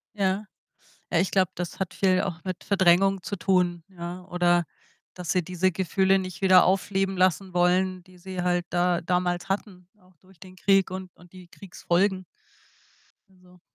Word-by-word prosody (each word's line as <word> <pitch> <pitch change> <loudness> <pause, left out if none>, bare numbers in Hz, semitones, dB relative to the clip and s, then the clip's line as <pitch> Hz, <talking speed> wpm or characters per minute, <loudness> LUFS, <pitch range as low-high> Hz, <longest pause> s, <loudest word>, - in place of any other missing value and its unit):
Ja. 195 +1 0 0.6
Ah, 165 - +1
ich 185 - 0
glaube, 185 -2 +2
das 175 -1 -6
hat 190 -2 -3
viel 185 -1 +2
auch 180 -4 -5
mit 185 -2 -5
Verdrängung 190 0 +3
zu 200 - -4
tun, 175 -1 +1
ja. 180 -1 -8
Oder, 175 -1 +1 0.5
dass 180 -2 -5
sie 180 - +2
diese 180 +2 0
Gefühle 190 +2 +1
nicht 185 -1 -7
wieder 185 -2 +6
aufleben 195 0 0
lassen 185 0 +1
wollen, 180 +1 +1
die 185 -1 -19
sie 185 0 -6
halt 175 -1 0
da 175 0 +1
damals 180 +1 -1
hatten, 190 -2 -4
auch 185 -1 -25
durch 185 +1 -23
den 185 +1 -13
Krieg 195 0 +2
und 185 -1 -7
und 175 0 -19
die 185 -1 -13
Kriegsfolgen. 185 +1 -1 1.1
Also 180 -1 -22
185 Hz, 165 wpm, -25 LUFS, 175-190 Hz, 1.1 s, wieder